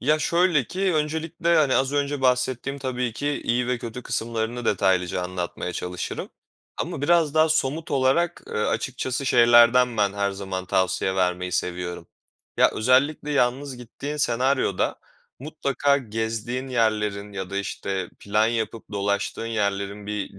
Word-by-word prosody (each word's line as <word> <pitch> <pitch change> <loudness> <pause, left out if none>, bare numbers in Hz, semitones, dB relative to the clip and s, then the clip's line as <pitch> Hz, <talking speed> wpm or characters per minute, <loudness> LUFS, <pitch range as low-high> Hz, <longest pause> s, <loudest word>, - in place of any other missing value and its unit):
Ya, 150 +4 +2
şöyle 170 -2 +2
ki 185 - -1
öncelikle, 160 +2 0
hani, 140 -4 +3
az 135 +1 +1
önce 145 0 -1
bahsettiğim 130 +1 0
tabii 125 -3 -2
ki 145 +5 -2
iyi 120 +1 +1
ve 125 0 0
kötü 120 +2 -7
kısımlarını 115 +1 -3
detaylıca 90 -4 +1
anlatmaya 90 0 -4
çalışırım. 90 +1 -5 0.5
Ama - - -4
biraz 160 -1 +3
daha 155 0 +5
somut 155 +1 0
olarak, 140 +6 +1
eee, - - -8
açıkçası 130 +4 -1
şeylerden 120 0 +6
ben, 100 -2 +2
her 100 0 0
zaman 95 -1 -5
tavsiye 95 +1 +1
vermeyi 90 -1 0
seviyorum. 90 -1 -3 0.5
Ya, - - +5
özellikle 135 +6 +2
yalnız 135 0 0
gittiğin 135 +5 -6
senaryoda 130 -6 +1 0.4
mutlaka 140 -1 0
gezdiğin 115 +2 -3
yerlerin 105 -4 0
ya 95 -2 -5
da, 100 - -4
işte, 95 -2 -3
plan 105 +2 +1
yapıp 115 -1 -2
dolaştığın 100 +2 -1
yerlerin 100 -2 -2
bir 105 -2 -4
120 Hz, 140 wpm, -24 LUFS, 100-140 Hz, 0.5 s, şeylerden